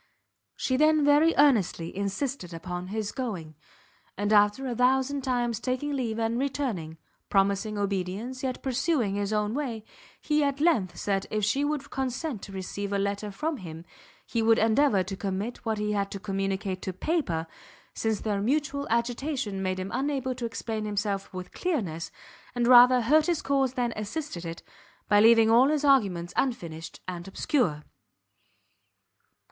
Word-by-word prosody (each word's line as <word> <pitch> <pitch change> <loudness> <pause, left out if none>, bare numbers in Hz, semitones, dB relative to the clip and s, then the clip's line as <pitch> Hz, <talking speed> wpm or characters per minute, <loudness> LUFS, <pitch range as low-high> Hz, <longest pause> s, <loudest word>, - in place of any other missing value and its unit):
She 260 - 0
then 305 0 +4
very 295 +3 +5
earnestly 215 - +3
insisted 200 -1 -3
upon 180 +2 -5
his 210 +1 -3
going; 195 - -5 0.6
and 205 +2 0
after 210 +5 +4
a 245 -2 -2
thousand 265 +3 +2
times 245 -4 -1
taking 260 +3 -2
leave 235 -5 -2
and 230 +1 0
returning, 245 - -2 0.3
promising 200 +2 +1
obedience, 200 +5 -3
yet 260 -2 -3
pursuing 265 - 0
his 200 0 -2
own 210 0 0
way, 240 -6 -3 0.3
he 300 -1 +1
at 280 0 0
length 290 - +2
said 195 -1 -1
if 215 -1 0
she 270 +7 +1
would 290 -1 -2
consent 265 -2 -3
to - - -9
receive 195 +1 -5
a 200 - +1
letter 200 +1 -2
from 305 +9 -3
him, 165 -4 -9 0.4
he 230 - -1
would 225 0 +4
endeavour 225 -2 +3
to 195 +2 -5
commit 200 +4 -4
what 220 -1 0
he 210 0 -1
had 200 -1 0
to 195 - -6
communicate 195 -1 -2
to 190 - -4
paper, 185 - -1 0.5
since 220 -2 -1
their 205 -2 -1
mutual 280 +4 0
agitation 235 -2 -1
made 185 -1 -1
him 185 +1 -4
unable 270 -2 -1
to 245 -1 -5
explain 225 -1 -4
himself 205 -1 -2
with 185 -1 -7
clearness, 190 - -2 0.5
and 240 -1 +1
rather 250 0 +8
hurt 300 +7 +4
his 340 -3 0
cause 270 -2 +1
than 240 -3 0
assisted 215 - -5
it, 165 0 -6 0.4
by 205 -1 +5
leaving 225 0 +6
all 245 +4 +6
his 300 -1 +1
arguments 195 -11 +2
unfinished 170 -11 -3
and 175 0 -6
obscure. 195 - 0
225 Hz, 160 wpm, -27 LUFS, 195-265 Hz, 0.6 s, rather